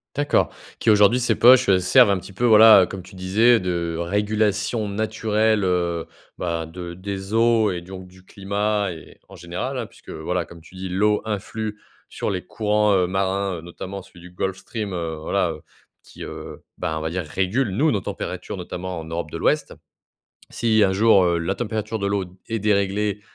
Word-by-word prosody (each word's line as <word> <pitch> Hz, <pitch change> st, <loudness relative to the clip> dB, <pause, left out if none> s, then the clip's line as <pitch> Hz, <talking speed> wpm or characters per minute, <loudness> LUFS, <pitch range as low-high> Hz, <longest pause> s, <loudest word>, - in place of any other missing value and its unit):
D'accord. 145 Hz, +1 st, +1 dB, 0.3 s
Qui -, -, +1 dB
aujourd'hui, 105 Hz, +3 st, +5 dB
ces 120 Hz, -2 st, +1 dB
poches 125 Hz, -1 st, +6 dB
servent 100 Hz, +5 st, +5 dB
un 100 Hz, -, +2 dB
petit 95 Hz, +2 st, -10 dB
peu 115 Hz, -, -5 dB
voilà, 110 Hz, -3 st, +8 dB
heu, -, -, +3 dB
comme 95 Hz, -2 st, -7 dB
tu 90 Hz, -, -15 dB
disais, 110 Hz, +6 st, +3 dB
de 85 Hz, -2 st, -2 dB
régulation 105 Hz, +3 st, 0 dB
naturelle, 110 Hz, 0 st, 0 dB
heu, 85 Hz, -2 st, 0 dB, 0.3 s
ben, 85 Hz, -2 st, -2 dB
de 85 Hz, +1 st, -8 dB
des 95 Hz, +2 st, -6 dB
eaux 115 Hz, -3 st, +3 dB
et 90 Hz, -1 st, -4 dB
donc 95 Hz, +1 st, -10 dB
du 95 Hz, 0 st, -18 dB
climat 100 Hz, 0 st, -1 dB
et 80 Hz, -2 st, -12 dB
en -, -, -12 dB
général, 90 Hz, +11 st, -5 dB
hein, 120 Hz, -, -3 dB
puisque -, -, -18 dB
voilà, 85 Hz, +2 st, -3 dB
comme 85 Hz, -1 st, -14 dB
tu 85 Hz, -, -18 dB
dis, 95 Hz, 0 st, -6 dB
l'eau 105 Hz, +3 st, +2 dB
influe 110 Hz, 0 st, -4 dB, 0.3 s
sur -, -, -3 dB
les 90 Hz, -2 st, -3 dB
courants, 105 Hz, +1 st, +1 dB
heu, 90 Hz, -1 st, +3 dB
marins, 95 Hz, 0 st, -1 dB
heu, -, -, -8 dB
notamment 95 Hz, +3 st, -8 dB
celui 90 Hz, -, -17 dB
du 90 Hz, 0 st, -13 dB
Gulf 95 Hz, +1 st, -3 dB
Stream, 105 Hz, -5 st, -5 dB
heu. 85 Hz, -2 st, -3 dB
Voilà, 90 Hz, 0 st, 0 dB
heu, 75 Hz, -1 st, -9 dB, 0.4 s
qui, -, -, -12 dB
heu, -, -, -9 dB, 0.2 s
ben, 80 Hz, 0 st, -2 dB
on -, -, -4 dB
va 80 Hz, +1 st, -3 dB
dire 90 Hz, 0 st, -2 dB
régule 95 Hz, -, -1 dB
nous 145 Hz, +12 st, +2 dB
nos 100 Hz, -, 0 dB
températures -, -, -5 dB
notamment 90 Hz, -1 st, -5 dB
en 80 Hz, -, -9 dB
Europe 85 Hz, +1 st, -4 dB
de -, -, -6 dB
l'Ouest. -, -, 0 dB, 0.7 s
Si 110 Hz, -2 st, +1 dB
un 95 Hz, -, +3 dB
jour, 100 Hz, -1 st, +5 dB
heu, 85 Hz, -1 st, +2 dB
la 85 Hz, +3 st, -1 dB
température 110 Hz, 0 st, -3 dB
de 100 Hz, -, -1 dB
l'eau, 100 Hz, -1 st, -1 dB, 0.2 s
est 115 Hz, -, -2 dB
déréglée 100 Hz, 0 st, 0 dB
100 Hz, 195 wpm, -22 LUFS, 90-110 Hz, 0.7 s, voilà